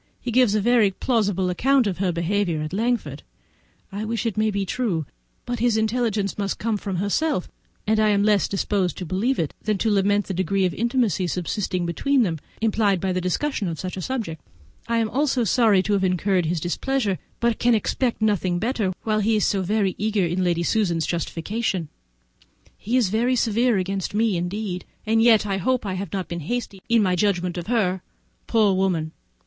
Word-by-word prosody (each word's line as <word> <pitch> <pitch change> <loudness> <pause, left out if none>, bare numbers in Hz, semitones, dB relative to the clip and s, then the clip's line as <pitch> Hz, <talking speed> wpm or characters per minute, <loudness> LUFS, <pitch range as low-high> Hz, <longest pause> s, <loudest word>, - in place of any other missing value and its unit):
He 245 - -4
gives 240 -3 +4
a 215 - +2
very 235 -1 +4
plausible 195 -4 0
account 265 +7 +3
of 190 -3 -2
her 190 -2 +1
behaviour 170 -1 -1
at 155 - -6
Langford; 235 +4 -1 0.7
I 200 +2 -4
wish 225 0 -2
it 225 - -1
may 215 0 +2
be 200 -1 -1
true, 185 - -1 0.4
but 245 -1 -3
his 235 -1 +2
intelligence 220 -3 0
must 200 -1 -1
come 225 0 -1
from 195 -2 -4
herself, 200 - 0 0.4
and 215 +1 +2
I 215 0 +4
am 200 -1 +3
less 205 -2 +3
disposed 195 -2 -1
to 180 - -5
believe 210 +11 0
it 155 - -1
than 215 -1 0
to 220 +2 +1
lament 205 0 +2
the 195 - -4
degree 190 +2 +1
of 180 - 0
intimacy 235 -5 0
subsisting 180 +1 -2
between 260 +10 +1
them, 165 -6 -2 0.2
implied 215 -3 +2
by 190 +1 -1
the 185 - -1
discussion 205 - -1
of 165 -2 -4
such 185 -1 -4
a 190 - -5
subject. 220 -10 -4 0.5
I 230 0 +1
am 225 -1 0 0.2
sorry 230 -6 +3
to 210 - 0
have 195 -1 +1
incurred 185 -1 +1
his 170 +1 0
displeasure, 205 - -1 0.2
but 235 -1 +1
can 240 -1 +4
expect 230 +2 -1
nothing 185 -4 +1
better 215 -2 -1
while 215 -1 +1
he 220 +2 +2
is 210 - +2
so 195 - +1
very 195 0 0
eager 210 -2 +1
in 175 +2 -1
Lady 170 -1 +1
Susan's 170 -5 +1
justification. 175 +1 -2 0.9
He 235 +5 -1
is 235 -7 +2
very 235 +5 +1
severe 230 0 +2
against 195 +1 -2
me 220 -2 +2
indeed, 180 +1 -3 0.2
and 225 +1 +2
yet 225 -2 +5
I 195 -2 -1
hope 250 +5 0
I 195 - -2
have 185 -1 -5
not 190 -4 -3
been 170 0 -4
hasty 200 +3 -4
in 230 -2 +4
my 185 -2 +2
judgment 180 -2 0
of 175 -1 -5
her. 195 -6 +1 0.5
Poor 215 -4 +3
woman! 180 -5 0
205 Hz, 195 wpm, -23 LUFS, 185-225 Hz, 0.9 s, yet